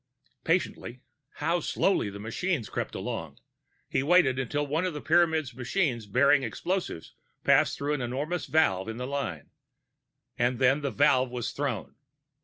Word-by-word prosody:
Patiently 160 -7 -1 0.3
(how 170 +2 0
slowly 170 - +1
the 100 - -8
machines 115 - -2
crept - - -4
along!) - - -5 0.5
he - - 0
waited 140 -4 +4
until 145 +3 -1
one 155 +4 -1
of 180 -4 -2
the - - -3
Pyramids' 160 -5 +2
machines 125 - -1
bearing 135 +6 +4
explosives 170 - -3 0.3
passed - - +4
through 145 +1 -1
an 145 - -2
enormous 145 +8 -3
valve 115 -10 +2
in 110 - -5
the 125 - -4
line 135 - -4 0.9
and 120 +1 +2
then 135 +3 +3
the 140 - -1
valve 130 -1 +3
was 120 -1 -3
thrown. 135 -8 -3
135 Hz, 150 wpm, -28 LUFS, 120-160 Hz, 0.9 s, waited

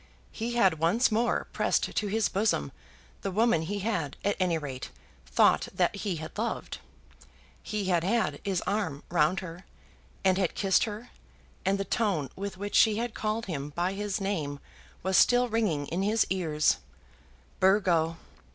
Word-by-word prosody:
He 235 +1 -4
had 190 -9 +3
once 210 +11 +3
more 235 +2 +1
pressed - - 0
to 210 - 0
his 215 +1 +1
bosom 190 - 0 0.5
the - - -2
woman 215 -2 +2
he 200 +5 -3
had, 180 -10 -2
at 205 - +2
any 180 -3 +2
rate, 135 -5 -6 0.4
thought 60 - +3
that - - +1
he 200 -2 -2
had 155 0 -7
loved. 230 +1 -3 0.8
He 210 -2 -3
had 175 -3 +2
had 220 +5 0
his 190 -3 -1
arm 190 -9 -2
round 175 +2 +2
her, 175 0 -8 0.6
and 190 0 +3
had 185 -4 0
kissed 190 -3 +3
her, 220 +2 -7 0.5
and 195 +1 +2
the 195 - -2
tone 185 - 0
with 200 0 -5
which 205 +1 -5
she 215 -2 +5
had 235 0 -2
called 215 +1 -2
him 145 -6 -4
by 175 +2 0
his 205 +1 -2
name 160 -8 -2 0.4
was 190 +1 +2
still 245 0 +5
ringing 205 -11 0
in 170 +6 -2
his 215 +3 +2
ears, 155 -5 +2 0.8
"Burgo!" 175 -4 +3
195 Hz, 160 wpm, -28 LUFS, 165-215 Hz, 0.8 s, she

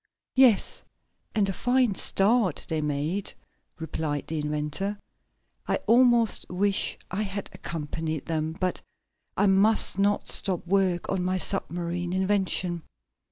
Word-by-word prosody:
"Yes, 255 -6 +4 0.5
and 205 -2 +2
a 195 - -1
fine 245 +2 +2
start 195 -2 +1
they 160 -1 -1
made," 150 +6 -1 0.5
replied 155 -3 -3
the 160 -1 -3
inventor. 150 +7 -2 0.7
"I - - +2
almost 240 -2 +4
wish 195 +2 +1
I 195 +4 -1
had 200 -1 -4
accompanied 160 -1 -4
them, 160 -1 -2
but 185 -1 -1 0.6
I - - +3
must 200 +1 +3
not 205 +1 +1
stop 185 -5 0
work 185 -1 +1
on 190 -2 0
my 185 +1 0
submarine 175 -2 0
invention." 185 -2 0
185 Hz, 120 wpm, -26 LUFS, 165-205 Hz, 0.7 s, Yes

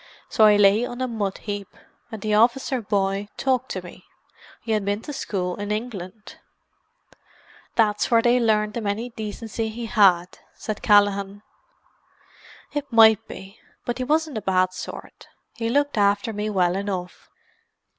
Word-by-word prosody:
So 220 - +4
I 210 -1 +7
lay 205 +2 +5
on 245 0 -5
a 255 - -1
mud 210 -5 -3
heap, 205 -2 -6 0.4
and 220 -3 -7
the 215 -1 0
officer 245 +4 +2
boy 200 -1 -1
talked 260 -1 0
to - - -5
me—he 225 - -13
had 215 -2 +1
been 205 +3 -2
to 295 - -6
school 180 -8 -3
in 205 0 -5
England." 210 -2 -6 1.4
"That's 210 -2 +2
where 230 -1 +4
they 245 +1 +4
larned 215 -2 +1
him 225 -3 -3
any 220 +5 -2
decency 220 0 -5
he 230 +2 -6
had," 190 -6 +3 0.2
said 215 -1 -5
Callaghan. 205 -1 +2 1.3
"It 290 -2 -4
might 220 -2 +6
be. 195 +2 -11 0.3
But 240 +1 -3
he - - -1
wasn't 305 -2 0
a - - -13
bad 185 -1 +1
sort. - - -9 0.3
He 230 0 -2
looked 285 -1 +1
after 205 +3 +2
me 210 +1 -3
well 180 -3 +1
enough. 190 -2 -5
215 Hz, 155 wpm, -23 LUFS, 200-235 Hz, 1.4 s, I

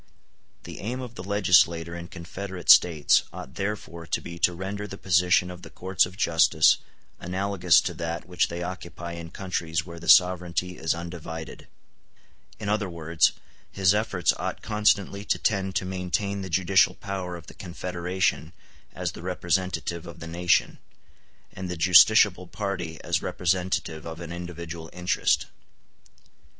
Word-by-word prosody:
The - - -9
aim 120 +5 -4
of 125 -3 -7
the 90 - -8
legislator 85 -4 +3
in 85 0 -7
confederate 95 +2 -1
States 80 -5 +5
ought 65 - -9
therefore 85 -3 -5
to - - 0
be 85 0 -9
to 90 - +4
render 100 +3 -5
the 100 - -8
position 90 -1 +2
of 90 -1 -10
the - - -11
courts 95 0 +1
of 90 +1 -14
justice 80 -5 +4 0.4
analogous 90 -1 +2
to 90 - -3
that 85 +1 -5
which 90 -1 +1
they 85 +1 -5
occupy 85 -1 -6
in 85 -1 -7
countries 85 -3 -3
where 85 -1 -9
the 85 -1 -5
sovereignty 90 0 +4
is 80 +1 -1
undivided; 85 -2 -8 0.9
in 105 - -5
other 105 -2 0
words, 85 -1 +1 0.4
his 95 0 +3
efforts 105 -4 +1
ought - - -4
constantly 105 -2 +1
to - - +1
tend 95 -2 -1
to 95 - 0
maintain 95 +2 -2
the 95 - -6
judicial 95 +2 +3
power 95 -3 -5
of 85 -3 -10
the - - -12
confederation 90 -1 -2 0.4
as - - -3
the - - -11
representative 90 -1 -2
of 85 - -10
the 80 - -7
nation, 85 +1 +1 0.7
and 95 -1 -6
the 90 - -4
justiciable 95 +1 +6
party 90 -6 -4
as - - 0
the - - -9
representative 90 -3 -1
of 80 0 -7
an 85 -1 -7
individual 85 -2 -7
interest. 90 0 +1
90 Hz, 155 wpm, -26 LUFS, 85-95 Hz, 0.9 s, justiciable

